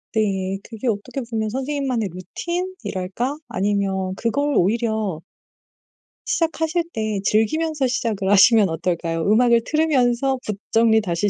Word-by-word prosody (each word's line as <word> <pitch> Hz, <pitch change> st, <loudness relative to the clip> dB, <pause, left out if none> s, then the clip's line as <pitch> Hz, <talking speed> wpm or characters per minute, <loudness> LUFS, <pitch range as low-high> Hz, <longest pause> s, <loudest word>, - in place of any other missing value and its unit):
네. 195 Hz, -3 st, 0 dB
그게 225 Hz, +2 st, -6 dB
어떻게 235 Hz, +5 st, -2 dB
보면 220 Hz, -2 st, -1 dB
선생님만의 260 Hz, -4 st, -2 dB
루틴이랄까? 255 Hz, -, -4 dB
아니면 190 Hz, -1 st, -1 dB
그걸 285 Hz, +6 st, 0 dB
오히려 215 Hz, -3 st, 0 dB, 1.1 s
시작하실 330 Hz, 0 st, 0 dB
때 215 Hz, -2 st, -2 dB
즐기면서 280 Hz, +7 st, +1 dB
시작을 215 Hz, -6 st, -1 dB
하시면 205 Hz, +1 st, +6 dB
어떨까요? 165 Hz, 0 st, -2 dB
음악을 235 Hz, +2 st, +4 dB
틀으면서 270 Hz, -4 st, +2 dB
붓 210 Hz, -2 st, -3 dB
정리 225 Hz, -1 st, +4 dB
다시 185 Hz, +1 st, 0 dB
225 Hz, 305 characters per minute, -22 LUFS, 195-270 Hz, 1.1 s, 하시면